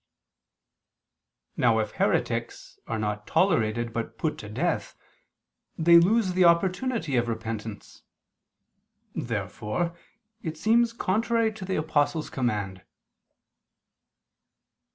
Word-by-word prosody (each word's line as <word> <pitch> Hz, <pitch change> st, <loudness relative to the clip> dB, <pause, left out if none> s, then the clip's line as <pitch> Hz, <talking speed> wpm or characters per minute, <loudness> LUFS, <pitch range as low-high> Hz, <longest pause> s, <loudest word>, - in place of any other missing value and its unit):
Now 115 Hz, -2 st, +3 dB
if 110 Hz, -2 st, -1 dB
heretics -, -, -1 dB
are 115 Hz, -, -2 dB
not 105 Hz, -1 st, -3 dB
tolerated 120 Hz, -, +1 dB
but 115 Hz, 0 st, -4 dB
put 155 Hz, -, -2 dB
to 105 Hz, -, -8 dB
death, 120 Hz, -, -2 dB, 0.8 s
they 170 Hz, +1 st, +7 dB
lose 195 Hz, +2 st, +3 dB
the 185 Hz, 0 st, +3 dB
opportunity 180 Hz, -, +2 dB
of 120 Hz, 0 st, +1 dB
repentance. 110 Hz, -2 st, -6 dB, 1.1 s
Therefore 170 Hz, +12 st, -3 dB, 0.5 s
it 160 Hz, -2 st, -5 dB
seems 230 Hz, +6 st, +3 dB
contrary 225 Hz, +1 st, +1 dB
to 200 Hz, -3 st, -8 dB
the 190 Hz, -, -2 dB
Apostle's 155 Hz, 0 st, 0 dB
command. 105 Hz, -7 st, -2 dB
155 Hz, 95 wpm, -27 LUFS, 110-185 Hz, 1.1 s, they